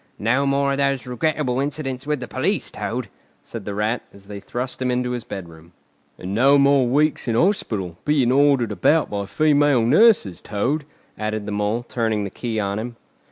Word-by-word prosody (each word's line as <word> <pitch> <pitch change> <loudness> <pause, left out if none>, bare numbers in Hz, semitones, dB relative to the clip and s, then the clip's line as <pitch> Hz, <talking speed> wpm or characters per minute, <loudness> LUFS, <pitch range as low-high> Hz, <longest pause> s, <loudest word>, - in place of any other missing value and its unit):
"No 130 +6 +1
more 140 0 +1
of 140 - -1
those 140 -2 0
regrettable 130 +1 -1
incidents 135 -2 -3
with 150 -3 -1
the 125 - -5
police, - - -1
Toad," - - -4 0.4
said 115 -4 -8
the 100 - -4
Rat, 110 +3 0
as 100 0 -16
they 100 0 -8
thrust 125 +5 -5
him 130 - 0
into 125 0 0
his 120 -2 -3
bedroom. 85 -4 -9 0.4
"And 95 +2 -6
no 135 +6 +5
more 140 -2 +4
weeks 150 +4 +1
in 115 - 0
hospital, 110 - 0
being 140 -5 +2
ordered 135 -4 +3
about 145 - +2
by 100 -1 -3
female 145 -4 +3
nurses, 145 - +4
Toad," 135 +9 -2 0.3
added 110 -1 -3
the 105 - -4
Mole, 105 +3 -1
turning 110 -3 -1
the 100 - -5
key 115 -3 -3
on 100 0 -2
him. 120 +1 -6
125 Hz, 185 wpm, -22 LUFS, 105-140 Hz, 0.4 s, no